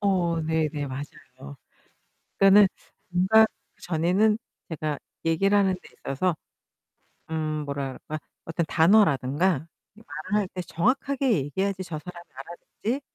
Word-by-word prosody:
어 180 -5 +1
네네. 155 -2 -1
맞아요. 130 - -9 0.8
그러니까는 195 0 +7 0.4
뭔가 190 +5 +5 0.4
전에는 185 +6 +2 0.3
제가 155 -2 -3 0.3
얘기를 195 +5 +3
하는데 190 -2 +2 0.3
있어서 170 +5 0 0.9
음 155 -1 -2
뭐라 140 -1 -3
그럴까? 155 0 -6 0.3
어떤 165 0 -1
단어라든가 160 -3 +3 0.3
이 220 - -17
말을 175 +8 -2
할 195 - -3
때 185 - -3
정확하게 255 - 0
얘기해야지 190 +5 -2
저 170 -4 -6
사람이 175 +2 -10
알아듣지 175 - -5
170 Hz, 285 characters per minute, -26 LUFS, 155-195 Hz, 0.9 s, 그러니까는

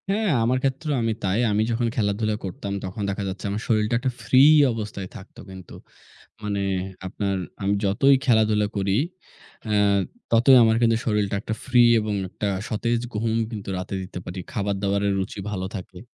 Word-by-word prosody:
হ্যাঁ, 210 +1 +1
আমার 125 +3 +2
ক্ষেত্রেও 140 +2 -1
আমি 115 -1 +1
তাই। 95 +3 +1
আমি 105 +1 +2
যখন 115 +1 0
খেলাধুলা 105 0 0
করতাম, 100 +2 -5
তখন 95 +3 -6
দেখা 100 +1 -3
যাচ্ছে 95 +1 -7
আমার 105 +2 -3
শরীরটা 110 +1 +1
একটা 130 +1 -1
ফ্রি 130 +3 +5 0.3
অবস্থায় 105 -4 -5
থাকত 95 - -12
কিন্তু। 95 -2 -11 0.7
মানে, 100 -1 -2 0.5
আপনার 100 +1 -2 0.3
আমি 100 +1 +1
যতই 135 +8 +4
খেলাধুলা 110 -3 +3
করি, 100 0 +1 0.7
অ্যা 105 -1 +1 0.5
ততই 120 +4 +6
আমার 110 0 +4
কিন্তু 115 -1 +3
শরীরটা 105 -3 0
একটা 110 - -4
ফ্রি 125 -2 +5 0.2
এবং 105 -1 -2 0.2
একটা 105 - -4 0.2
সতেজ 115 +2 -1 0.2
ঘুম 110 +1 0 0.2
কিন্তু 105 -3 -6
রাতে 90 +2 -5
দিতে 90 -1 -7
পারি। 90 +1 -6
খাবার-দাবারের 100 0 0
রুচি 95 +2 -4
ভালো 95 -2 -3
থাকে। 90 -1 -8
105 Hz, 165 wpm, -24 LUFS, 100-115 Hz, 0.7 s, ততই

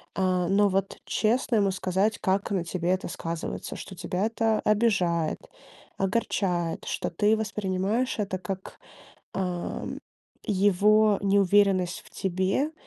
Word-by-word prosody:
а, 185 -2 +1
но 200 +1 +4
вот 195 0 -1
честно 235 +2 +1
ему 200 -2 +3
сказать, 190 +3 0
как 190 +1 0
на 190 -4 0
тебе 175 +1 -1
это 185 -1 -1
сказывается. 165 -1 -5
Что 195 - -8
тебя 180 +3 -2
это 225 -1 +1
обижает, 195 -7 +1 0.6
огорчает, 185 -4 -1
что - - -2
ты 205 +6 +3
воспринимаешь 210 +3 -1
это 195 -3 -2
как, 190 +1 -6 0.6
ам, 180 -2 -3 0.4
его 205 +1 +4
неуверенность 195 -2 +3
в - - -19
тебе, 190 - -1
195 Hz, 120 wpm, -27 LUFS, 185-210 Hz, 0.6 s, но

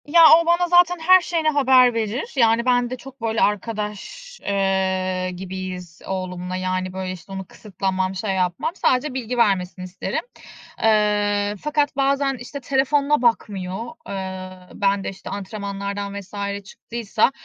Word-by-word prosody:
Ya, 335 +3 +5 0.2
o - - -4
bana 345 +1 +3
zaten 355 0 +4
her 370 +3 +6
şeyini 330 -2 0
haber 260 -4 +5
verir 230 - -3
yani 230 -2 +3
ben 245 -1 +2
de 255 - -4
çok 270 0 -13
böyle 225 0 0
arkadaş, 215 - -3
eee, 190 -2 0
gibiyiz 185 -2 -7
oğlumla 185 -1 -4
yani, 185 0 -2
böyle, 185 0 -4
işte, 185 +1 -10
onu 190 0 -5
kısıtlamam, 190 -1 -3
şey 195 +2 -2
yapmam. 180 - 0
Sadece 260 -4 +1
bilgi 250 -1 -3
vermesini 190 -5 +1
isterim, 185 +1 -3 0.6
eee, 205 -1 +2
fakat 295 -2 0
bazen, 275 0 +1
işte, 250 +4 -7
telefonuna 280 +1 +2
bakmıyor. 205 -4 0 0.2
Eee, 190 -1 -5 0.2
ben 200 0 +1
de, - - -3
işte, 195 - -9
antrenmanlardan 200 0 -4
vs. 200 +1 -5
çıktıysa, 225 +3 -1
205 Hz, 140 wpm, -22 LUFS, 190-260 Hz, 0.6 s, her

